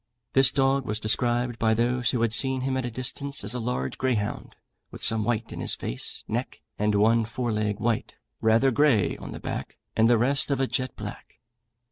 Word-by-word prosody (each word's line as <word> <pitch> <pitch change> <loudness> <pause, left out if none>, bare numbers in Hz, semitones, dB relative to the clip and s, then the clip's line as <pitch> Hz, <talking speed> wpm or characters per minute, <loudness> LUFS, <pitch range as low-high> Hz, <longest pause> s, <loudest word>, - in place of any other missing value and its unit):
This 135 -1 +6
dog 135 -1 +1
was 105 +1 -2
described 120 +2 0
by 110 0 +2
those 125 +2 +1
who 120 -3 0
had 115 -2 +1
seen 130 +1 +3
him 130 0 -1
at 130 -1 -2
a - - -2
distance 135 +4 -1
as - - +3
a 125 - -2
large 115 - -3
greyhound, 115 -5 -2 0.3
with - - -10
some 110 -1 +3
white 115 0 -2
in - - -7
his - - +3
face, 60 - -1
neck - - -4 0.2
and 105 0 +1
one 115 +3 +3
fore 120 +1 -3
leg 105 -1 -1
white, 115 -1 -1 0.3
rather 115 +4 +3
grey 130 -6 +2
on - - -9
the - - -7
back, - - -6 0.2
and 110 +1 +4
the 120 - +5
rest 135 +5 +2
of 140 -2 0
a 135 - +2
jet 130 0 -2
black. - - -9
120 Hz, 205 wpm, -26 LUFS, 110-130 Hz, 0.3 s, This